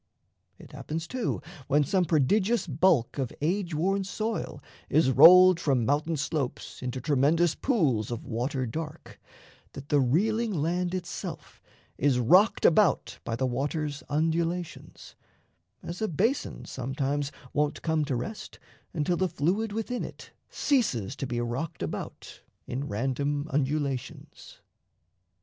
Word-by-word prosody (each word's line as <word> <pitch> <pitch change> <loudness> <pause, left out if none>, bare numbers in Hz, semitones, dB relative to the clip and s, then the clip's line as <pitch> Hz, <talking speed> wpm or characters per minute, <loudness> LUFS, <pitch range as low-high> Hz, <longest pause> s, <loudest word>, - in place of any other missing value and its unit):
It - - -14
happens, 160 +2 -5
too, 255 -2 -3 0.2
when 145 +1 +3
some 185 +4 +1
prodigious 190 - +2
bulk 155 -5 +2
Of 130 -3 -2
age 175 +2 -1
worn 195 +5 +1
soil 215 +3 -3 0.3
is 150 -3 +3
rolled 180 +6 +8
from 135 -8 +1
mountain 150 +4 0
slopes 140 -2 -3
Into 125 0 -4
tremendous 150 +5 +2
pools 145 - 0
of 120 -1 -5
water 130 +3 -2
dark, 155 +6 -7 0.5
That 140 +1 -10
the 145 - +4
reeling 210 - +1
land 175 +4 -1
itself 180 -1 -7 0.4
is 135 -2 +3
rocked 180 - +4
about 190 +3 +3
By 115 - -3
the 130 +3 -1
water's 145 +3 -2
undulations; 165 +3 -2 0.7
as 175 +4 -6
a 220 - +1
basin 215 - -1
Sometimes 140 +2 -2 0.2
won't 150 0 -1
come 160 -2 +1
to 140 -3 -2
rest 125 - -6 0.4
until 170 +2 0
the 185 +1 +1
fluid 195 +10 0
Within 225 +3 -3
it - - -10 0.2
ceases 210 - 0
to 135 - -3
be 120 -1 -2
rocked 125 - -3
about 80 - -7 0.2
In 135 +3 -4
random 140 +5 -1
undulations. 140 -2 -3
150 Hz, 130 wpm, -28 LUFS, 135-180 Hz, 0.7 s, rolled